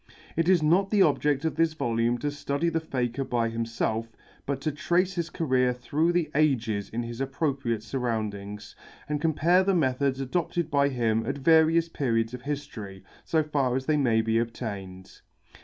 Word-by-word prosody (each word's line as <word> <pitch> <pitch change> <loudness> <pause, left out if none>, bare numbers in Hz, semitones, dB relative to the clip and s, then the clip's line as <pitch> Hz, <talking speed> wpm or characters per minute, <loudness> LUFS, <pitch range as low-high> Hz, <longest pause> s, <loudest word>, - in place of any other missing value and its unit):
It 165 +2 +1
is 180 -4 +4
not 180 +6 +3
the 205 -2 +4
object 150 -2 +1
of 160 - 0
this 165 -1 +2
volume 120 -4 0
to 145 +4 -2
study 145 +3 -1
the 165 - 0
Faker 130 -4 -2
by 120 -3 0
himself, 115 0 -2 0.4
but 140 -1 -1
to 155 - -1
trace 175 +5 +1
his 170 -2 -3
career 130 -6 +1
through 150 +7 0
the 170 -3 0
ages 120 -9 +1
in 120 +2 -3
his 120 +2 -6
appropriate 135 -5 -1
surroundings, 105 -4 -4 0.3
and 150 -1 -2
compare 165 +3 +3
the 195 0 +2
methods 135 -3 +1
adopted 165 +5 -2
by 140 -1 +3
him 115 -4 0
at 140 +2 -2
various 160 +3 +4
periods 115 -7 -1
of 125 - -6
history, 125 -9 -6 0.2
so 160 -1 +1
far 140 -4 0
as 130 0 -2
they 155 - +2
may 120 -6 +3
be 115 0 +1
obtained. 100 -5 -6
135 Hz, 175 wpm, -27 LUFS, 115-160 Hz, 0.4 s, is